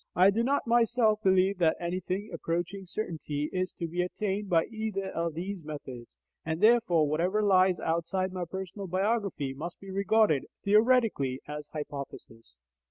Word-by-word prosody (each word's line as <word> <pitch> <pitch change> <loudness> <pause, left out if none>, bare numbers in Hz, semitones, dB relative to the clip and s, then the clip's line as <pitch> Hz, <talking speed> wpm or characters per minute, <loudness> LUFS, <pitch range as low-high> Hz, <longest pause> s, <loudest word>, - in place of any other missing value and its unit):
I 185 +3 +6
do 220 +3 0
not 275 +4 +1
myself 230 -2 +3
believe 190 -1 +3
that 160 -2 +3
anything 185 +3 -3
approaching 175 +4 -3
certainty 155 -7 -4
is 185 -1 -1
to 170 - -4
be 175 +2 -2
attained 200 +2 -2
by 165 -3 +3
either 215 -4 -4
of 165 -1 -2
these 185 +1 -5
methods, 130 -6 -8 0.4
and 160 0 -3
therefore 215 -9 +4
whatever 180 +8 +1
lies 185 -2 +4
outside 175 +3 -1
my 180 -1 -3
personal 190 +2 -6
biography 190 - -1
must 165 +6 -7
be 195 -1 -10
regarded, 200 -5 +2 0.2
theoretically, 210 - +3
as 150 0 -6
hypothesis. 140 - -8
185 Hz, 150 wpm, -29 LUFS, 160-205 Hz, 0.4 s, I